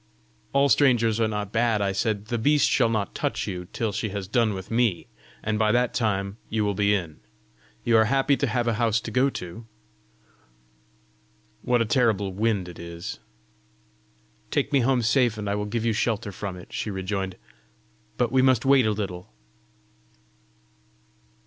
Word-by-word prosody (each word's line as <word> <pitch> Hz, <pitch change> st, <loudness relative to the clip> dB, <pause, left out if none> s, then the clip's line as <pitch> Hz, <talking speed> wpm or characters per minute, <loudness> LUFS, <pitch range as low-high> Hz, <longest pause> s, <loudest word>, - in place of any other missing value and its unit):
"All 140 Hz, +1 st, +3 dB
strangers 115 Hz, -4 st, +3 dB
are 115 Hz, -, +3 dB
not 105 Hz, -2 st, -4 dB
bad!" 115 Hz, -1 st, +2 dB
I 100 Hz, -1 st, 0 dB
said. 105 Hz, +1 st, -1 dB
"The 120 Hz, +1 st, -2 dB
beast 145 Hz, +5 st, +3 dB
shall 115 Hz, -4 st, +3 dB
not 110 Hz, -5 st, -1 dB
touch -, -, -2 dB
you 90 Hz, -1 st, -5 dB
till 115 Hz, -2 st, -2 dB
she 105 Hz, +2 st, -3 dB
has 100 Hz, -1 st, -5 dB
done 110 Hz, 0 st, +1 dB
with 95 Hz, +3 st, -8 dB
me, 115 Hz, -7 st, +1 dB, 0.4 s
and 110 Hz, -1 st, -1 dB
by 110 Hz, -1 st, +3 dB
that 125 Hz, 0 st, +2 dB
time 100 Hz, -3 st, -1 dB
you 110 Hz, -1 st, 0 dB
will 100 Hz, -, 0 dB
be 100 Hz, +1 st, +2 dB
in. 85 Hz, -6 st, -5 dB, 0.6 s
You 115 Hz, -1 st, +4 dB
are 110 Hz, -, +5 dB
happy 135 Hz, +4 st, +2 dB
to 140 Hz, -, 0 dB
have 120 Hz, +1 st, -1 dB
a 115 Hz, -, +2 dB
house 115 Hz, -1 st, +2 dB
to 115 Hz, -, -7 dB
go 130 Hz, +2 st, +3 dB
to! 90 Hz, 0 st, -8 dB, 1.9 s
What 120 Hz, -1 st, +2 dB
a -, -, -4 dB
terrible 105 Hz, -3 st, +1 dB
wind 105 Hz, -2 st, 0 dB
it 90 Hz, -, -10 dB
is!" 85 Hz, 0 st, -7 dB, 1.3 s
"Take -, -, -1 dB
me 140 Hz, -, +5 dB
home 125 Hz, 0 st, +2 dB
safe, 120 Hz, -1 st, +2 dB
and 105 Hz, -1 st, -4 dB
I 100 Hz, -, 0 dB
will 105 Hz, 0 st, -2 dB
give 115 Hz, +2 st, -2 dB
you 115 Hz, -, +2 dB
shelter 110 Hz, -1 st, -1 dB
from 95 Hz, -1 st, -6 dB
it," 90 Hz, -, -13 dB
she -, -, -3 dB
rejoined. 95 Hz, -1 st, -3 dB, 0.8 s
"But 120 Hz, -2 st, +1 dB
we 130 Hz, 0 st, +4 dB
must 130 Hz, -2 st, +3 dB
wait 135 Hz, -4 st, +5 dB
a -, -, +2 dB
little!" 95 Hz, -4 st, -5 dB
110 Hz, 175 wpm, -25 LUFS, 100-120 Hz, 1.9 s, are